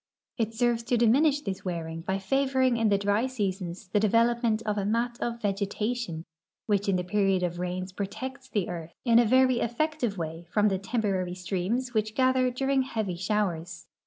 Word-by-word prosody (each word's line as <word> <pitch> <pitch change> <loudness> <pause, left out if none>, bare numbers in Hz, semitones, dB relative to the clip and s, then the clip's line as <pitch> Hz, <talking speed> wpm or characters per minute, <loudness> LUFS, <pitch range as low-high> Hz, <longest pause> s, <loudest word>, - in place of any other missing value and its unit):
It 225 0 -1
serves 240 0 +2
to 240 +1 +1
diminish 275 +6 +4
this 195 -7 -5
wearing 165 -2 -4
h\^ 190 +1 +1
favoring 260 +1 +2
in 225 -1 +2
the 200 - +4
diy 205 +5 +1
seasons 190 -5 -3
the 205 - +2
de 215 0 +2
velopment 230 0 +2
of 210 -1 -1
a - - -1
mat 235 +4 -1
of 235 0 -2
vegetation 200 -3 -2 0.4
which 205 -1 +1
in 195 - +3
the 180 - 0
period 195 0 +1
of 175 0 -2
rains 185 +1 -3
ju'otects 260 +8 -6
the 205 -5 -1
earth 170 -2 -7
in 235 -1 +6
a 240 - +5
very 255 +1 +4
effective 240 -3 -1
way 165 0 -5
from 210 0 +3
the 190 -1 -1
temporary 195 -4 -1
streams 195 +7 -2
which 215 -1 0
gather 255 -1 +3
during 270 +2 +1
heavy 220 -8 -2
showers. 175 -3 -2
210 Hz, 185 wpm, -28 LUFS, 185-240 Hz, 0.4 s, in